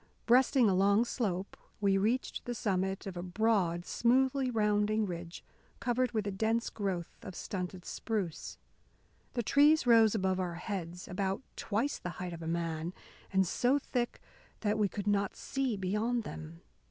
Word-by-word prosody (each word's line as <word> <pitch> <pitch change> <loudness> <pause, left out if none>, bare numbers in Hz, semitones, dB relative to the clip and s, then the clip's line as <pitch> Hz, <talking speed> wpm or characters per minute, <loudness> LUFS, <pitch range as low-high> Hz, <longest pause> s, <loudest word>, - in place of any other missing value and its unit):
Breasting 250 0 +5
a 195 - +3
long 200 +4 +4
slope, 195 -6 -2 0.2
we 200 -1 +3
reached 220 +7 0
the 245 - -3
summit 190 -2 -1
of 195 -2 -5
a 175 - -4
broad, 180 -2 +1
smoothly 260 +2 +2
rounding 210 -1 +2
ridge 175 -2 -6 0.4
covered 250 +1 +1
with 215 -3 -1
a 205 - -1
dense 220 +4 0
growth 190 -5 -3
of 190 -6 -8
stunted 180 -1 -5
spruce. 205 -8 -3 0.8
The 240 - 0
trees 295 +6 +5
rose 225 -2 +6
above 190 -2 +1
our 175 -2 -2
heads, 180 -2 -5
about 195 +5 -2
twice 225 +7 -1
the 180 - -4
height 180 -2 -4
of 170 - -8
a 160 - -5
man, 165 0 -2 0.4
and 190 -1 +3
so 245 +9 +2
thick 245 -3 -2 0.4
that 210 0 +1
we 205 -2 +3
could 200 +1 -5
not 200 -1 +1
see 265 -5 -2
beyond 210 +5 0
them. 80 - -8
205 Hz, 160 wpm, -32 LUFS, 180-235 Hz, 0.8 s, rose